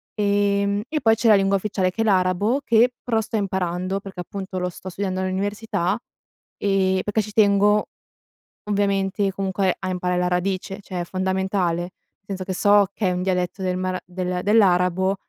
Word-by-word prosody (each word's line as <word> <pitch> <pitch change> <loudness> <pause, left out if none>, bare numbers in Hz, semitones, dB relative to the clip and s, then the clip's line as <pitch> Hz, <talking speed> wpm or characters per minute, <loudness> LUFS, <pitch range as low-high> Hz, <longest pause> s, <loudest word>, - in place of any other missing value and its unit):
Ehm, 200 0 +1
e 305 +3 -2
poi 225 -2 +4
c'è 230 +1 0
la 215 - +8
lingua 195 0 +3
ufficiale 190 -2 -1
che 225 - -3
è - - +1
l'arabo, 200 +6 +2
che 235 +2 +4
pro 230 -2 +1
sto 220 - -5
imparando, 190 -2 -1
perché 195 -2 -8
appunto 190 +1 -6
lo 180 0 -1
sto 180 +1 -9
studiando 185 0 -3
all'università, 195 0 -1 0.6
ehm, 190 -2 +1
perché 210 +1 0
ci 210 0 -8
tengo, 210 -1 +4 0.8
ovviamente, 200 -1 0
comunque 190 -1 -1
a 190 - -4
imparare 180 0 -1
la 180 - +1
radice, 190 +2 -2
cioè, 185 -2 -5
è - - -2
fondamentale, 185 -1 -1 0.4
senso 195 -2 -5
che 185 0 -4
so 205 +1 +4
che 205 - 0
è - - +1
un 180 0 -2
dialetto 180 0 -1
del 185 -1 -1
mar 185 0 -2
del 180 0 -3
dell'arabo, 190 -2 +3
195 Hz, 175 wpm, -23 LUFS, 185-205 Hz, 0.8 s, la